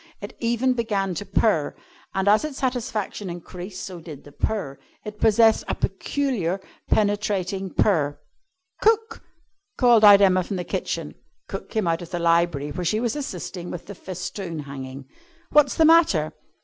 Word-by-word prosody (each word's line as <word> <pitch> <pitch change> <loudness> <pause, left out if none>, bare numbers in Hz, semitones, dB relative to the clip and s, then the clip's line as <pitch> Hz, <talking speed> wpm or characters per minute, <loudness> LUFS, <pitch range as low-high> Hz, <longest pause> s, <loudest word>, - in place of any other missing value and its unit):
It 205 - -8
even 240 +2 +1
began 205 -6 -1
to 200 +4 -6
purr, 195 -6 +1 0.4
and 190 +1 0
as 210 +5 +5
its 305 -3 -5
satisfaction 240 -6 -3
increased 180 +2 -8
so 180 -2 -8
did 155 -4 -10
the 145 - -14
purr. 150 -5 -3 0.3
It 210 0 -8
possessed 225 0 +4
a - - -1
peculiar 220 - -1 0.3
penetrating 205 -2 0
purr. 145 -8 +1 0.6
"Cook!" 450 +1 +2 0.6
called 240 -4 +5
out 205 -1 +9
Emma 185 -2 +4
from 195 - -5
the 180 - -3
kitchen. - - -3 0.3
Cook - - -7
came 220 -4 -1
out 165 +1 0
of 170 - -8
the 175 - -3
library 170 -4 +1
where 180 +5 -4
she 215 +6 +1
was 235 +1 -1
assisting 185 - -5
with 175 - -7
the 200 - -8
festoon 185 -1 -6
hanging. 135 -1 -8 0.5
"What's 295 -3 +4
the 320 - +4
matter?" 310 - +4
195 Hz, 160 wpm, -24 LUFS, 170-225 Hz, 0.6 s, out